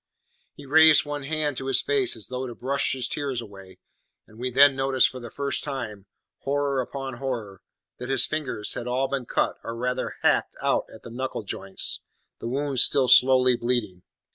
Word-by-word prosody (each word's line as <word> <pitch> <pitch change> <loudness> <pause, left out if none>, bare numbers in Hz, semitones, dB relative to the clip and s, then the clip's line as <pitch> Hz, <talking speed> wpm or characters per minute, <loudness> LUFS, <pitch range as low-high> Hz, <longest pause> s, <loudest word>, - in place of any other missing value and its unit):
He 145 - -12
raised 160 +2 +6
one 145 0 -5
hand 150 -1 -2
to 135 - -5
his 135 - +2
face 395 -5 +1
as - - -5
though 130 +1 -4
to 120 - -8
brush 140 +2 -1
his 130 -2 0
tears 140 -4 -3
away, 95 -5 -11 0.5
and 110 - -18
we 125 +1 -2
then 140 +2 +6
noticed 135 -1 +3
for 130 - -9
the 120 -1 -9
first 140 +3 -2
time 115 -9 -6 0.3
horror 140 -1 -1
upon 135 0 -6
horror! 115 -8 -5 0.4
that 125 - -6
his 135 -2 +3
fingers 150 -9 -3
had 120 - -6
all 130 +2 0
been 135 -2 -4
cut, - - 0
or 115 - -6
rather 125 +2 -3
hacked - - +2
out, - - 0
at 110 - -14
the 115 - -10
knuckle 130 -1 -4
joints, 95 -1 -2 0.4
the - - -6
wounds 135 +1 0
still 135 -2 +3
slowly 130 0 +6
bleeding. 120 -7 -2
130 Hz, 190 wpm, -25 LUFS, 120-140 Hz, 0.5 s, raised